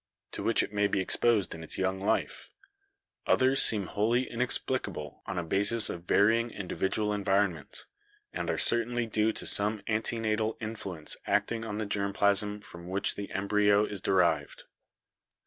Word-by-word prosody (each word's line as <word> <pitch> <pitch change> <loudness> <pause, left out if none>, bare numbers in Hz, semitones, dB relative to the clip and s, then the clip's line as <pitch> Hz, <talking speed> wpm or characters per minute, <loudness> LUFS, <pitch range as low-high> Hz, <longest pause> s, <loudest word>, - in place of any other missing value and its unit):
to - - -6
which - - +1
it - - -7
may 100 0 +2
be 100 - -1
exposed 100 0 +1
in 80 - -9
its - - -4
young 95 0 -1
life, 100 - -2 0.8
others 130 +1 +3
seem 105 -4 +4
wholly 115 +7 0
inex 125 +2 0
plicable 95 - -5
on 95 - -4
a 90 - -1
basis 100 +7 +4
of 85 0 -8
varying 115 +5 +3
individual 105 +1 -2
environment, 100 -6 -1 0.5
and - - -4
are - - -1
certainly 120 0 0
due 110 0 0
to - - -6
some 105 +1 +3
antenatal 110 0 -1
influence 100 -8 -2
acting 115 -1 0
on 105 -2 -5
the 110 - -2
germ 100 -1 -2
plasm 100 +1 +2
from 85 -4 -12
which 95 +2 0
the 100 -1 -7
embryo 105 +1 +2
is 100 -2 -3
derived. 90 -4 0
105 Hz, 160 wpm, -29 LUFS, 95-110 Hz, 0.8 s, seem